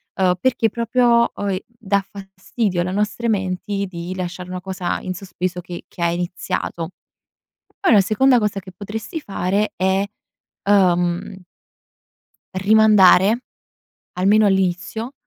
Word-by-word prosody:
ehm, 185 -1 +2
perché 235 0 +2
proprio 235 +1 +2
oi 195 -2 -2
dà 210 -4 -1
fastidio 195 0 -3
alle 180 +1 -2
nostre 210 +4 -1
menti 195 0 -1
di 175 0 -6
lasciare 180 0 -5
una 180 0 -5
cosa 185 -1 -3
in 185 - -4
sospeso 180 -1 -4
che 175 0 -9
che - - -11
ha 170 - +2
iniziato. 170 -1 -3 0.9
Poi 390 - +3
la 210 - +7
seconda 250 +6 +3
cosa 210 -2 -1
che 185 0 -13
potresti 215 - -6
fare 200 -3 -1
è, 190 +1 +1 0.6
ehm 180 -2 +2 1.2
rimandare, 210 +1 +5 0.7
almeno 205 +4 +4
all'inizio, 195 +5 -1
195 Hz, 120 wpm, -20 LUFS, 180-215 Hz, 1.2 s, la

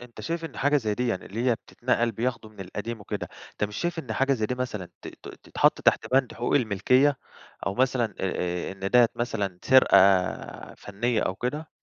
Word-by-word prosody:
أنت 120 -3 -12
شايف 165 +9 -3
إن 160 - -8
حاجة 145 +2 +2
زي 110 -6 -1
ديًا 120 0 0
اللي 110 +5 -5
هي 120 - +3
بتتنقل 120 0 -1
بياخدوا 115 0 -3
من 105 - -14
القديم 105 +4 -6
وكده، 100 - -5 0.2
أنت - - -2
مش 105 0 -6
شايف 175 -1 -2
إن 125 -8 -4
حاجة 135 +4 +1
زي 110 -5 0
دي 125 - -2
مثلًا 110 -8 -4
ت - - -7
ت - - -12 0.2
تتحط - - +2
تحت - - +3
بَند 130 -2 +2
حقوق 120 - -1
الملكية، 130 +4 +3 0.5
أو 95 - -1
مثلًا، 125 -4 +1
آآ، 90 -1 -2
إن 95 0 -5
ديّة 120 -1 +6
مثلًا 105 -6 -3
سرقة 130 -6 +6 0.8
فنية 110 +3 -2
أو 95 - -1
كده؟ 145 +9 -4
120 Hz, 195 wpm, -26 LUFS, 105-130 Hz, 0.8 s, ديّة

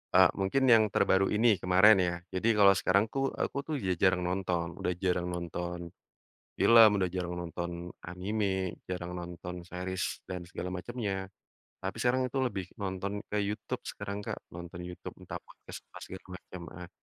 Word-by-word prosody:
Eee, - - +8
mungkin 95 +8 +2
yang 110 - +7
terbaru 95 +1 +4
ini 115 +2 +5
kemarin 95 +4 +7
ya, 85 - 0 0.2
jadi 95 +4 0
kalau 100 -1 +8
sekarang 100 +3 +3
tuh 135 0 0 0.2
aku - - -1
tuh 155 - -2
udah 95 -2 0
jarang 90 -1 +4
nonton, 90 -2 0
udah 90 - 0
jarang 90 -1 +1
nonton 85 0 -4 0.8
film, 115 -2 +8
udah 90 - +2
jarang 90 -1 -2
nonton 85 +1 -4 0.3
anime, 100 +4 -2 0.4
jarang 90 -1 -4
nonton 90 +1 -7
series 95 +1 -3 0.3
dan 90 -1 -4
segala 90 - -4
macemnya. 110 0 -3 0.7
Tapi 95 0 -3
sekarang 125 +1 +2
itu 135 - -3
lebih 100 -6 -3 0.2
nonton 95 0 -2 0.2
ke 105 - -3
Youtube 105 +1 -4
sekarang 100 +1 -5
Kak, - - -4 0.2
nonton 85 +1 -8
Youtube 90 - -8
entah - - -6
podcast - - -11
apa - - -11
segala 95 0 -9
macem 90 -1 -10 0.2
ah 90 -1 -8
95 Hz, 165 wpm, -31 LUFS, 90-100 Hz, 0.8 s, Eee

